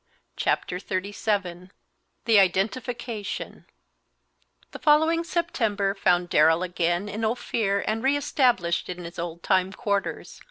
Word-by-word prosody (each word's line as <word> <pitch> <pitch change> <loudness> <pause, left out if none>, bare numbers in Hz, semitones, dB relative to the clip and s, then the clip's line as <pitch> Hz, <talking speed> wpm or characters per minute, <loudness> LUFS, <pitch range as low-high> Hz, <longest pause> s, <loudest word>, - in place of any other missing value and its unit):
Chapter 180 - -1
XXXVII 190 -2 -3 0.6
THE 225 -3 +6
IDENTIFICATION 215 +3 -2 1.0
The - - -9
following 320 +2 +3
September 225 - -1
found 180 -3 +2
Darrell 160 +2 +4
again 175 +1 -1
in 210 +2 -5
Ophir 220 -3 0
and 220 +1 -1
re 275 +3 +2
established 245 - +1
in 180 0 -6
his 170 0 -8
old 170 0 -5
time 190 -1 +2
quarters. 200 -2 -3
200 Hz, 115 wpm, -25 LUFS, 180-235 Hz, 1.0 s, THE